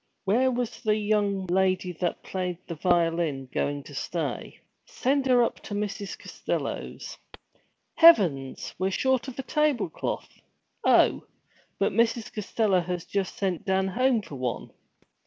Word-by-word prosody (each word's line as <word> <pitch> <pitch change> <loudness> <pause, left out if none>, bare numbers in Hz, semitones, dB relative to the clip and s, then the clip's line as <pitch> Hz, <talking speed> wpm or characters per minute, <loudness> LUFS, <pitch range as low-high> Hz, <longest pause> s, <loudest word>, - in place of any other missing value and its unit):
Where 240 +7 +3
was 245 -2 -3
the 215 -3 +2
young 205 -2 0
lady 185 0 +1
that 175 - -1
played 180 -2 -3
the 170 - -5
violin 165 -5 +1
going 145 0 -1
to 145 - -12
stay? 165 +4 -4 0.3
Send 270 +1 0
her 250 -2 +5
up - - -2
to 205 - -7
Mrs. 205 -1 -4
Costello's. - - -5 0.7
Heavens! 175 - +5
We 185 - +1
were - - -1
short 260 +5 +1
a 265 - -5
tablecloth! 300 - -1 0.4
Oh, - - +4 0.5
but - - +1
Mrs. 230 0 +1
Costello 210 -2 +1
had 175 0 -4
just 195 -2 -2
sent 185 -4 -1
Dan 190 0 +1
home 245 +1 +2
for 145 - -9
one. 125 -2 -3
195 Hz, 140 wpm, -27 LUFS, 175-235 Hz, 0.7 s, her